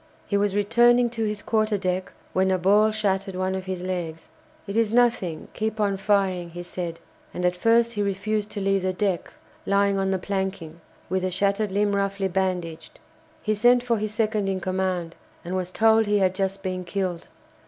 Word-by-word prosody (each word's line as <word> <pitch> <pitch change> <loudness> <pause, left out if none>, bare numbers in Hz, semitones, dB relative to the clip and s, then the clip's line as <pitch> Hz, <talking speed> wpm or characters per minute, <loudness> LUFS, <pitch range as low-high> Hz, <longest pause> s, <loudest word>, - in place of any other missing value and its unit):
He 200 - -2
was 200 -1 +1
returning 240 +3 +4
to 225 -2 -2
his 210 -1 -3
quarter 215 -1 +1
deck, 185 -1 -2 0.2
when 190 0 +2
a 190 - +2
ball 205 +4 +4
shattered 195 -3 -1
one 185 +1 -1
of 190 -1 -4
his 185 -1 -4
legs. 175 -3 -4 0.4
"It 200 0 -5
is 225 -2 +2
nothing 230 -9 +1
keep 220 0 -3
on 200 -2 +1
firing," 190 -3 +1
he 175 +1 -7
said, 175 -2 -5 0.4
and 180 - -1
at 180 0 +2
first 230 +5 +3
he 205 - -2
refused 205 +1 -1
to 205 - -5
leave 195 0 +2
the 185 0 -1
deck, 190 -2 -1 0.4
lying 200 0 +2
on 195 0 0
the 190 - +1
planking, 190 -4 -4 0.3
with 190 0 -1
the 185 - 0
shattered 200 +2 0
limb 205 +1 +1
roughly 200 0 0
bandaged. 180 -3 -3 0.4
He 215 - +1
sent 240 +3 +4
for 235 -2 +1
his 215 0 -2
second 215 -2 0
in 190 -1 -1
command, 185 -2 -2 0.3
and 180 +2 -3
was 185 -1 -2
told 220 +2 +4
he 205 0 +3
had 190 -2 +2
just 195 0 -2
been 185 -1 -3
killed. 180 -2 -3
195 Hz, 195 wpm, -25 LUFS, 185-210 Hz, 0.4 s, returning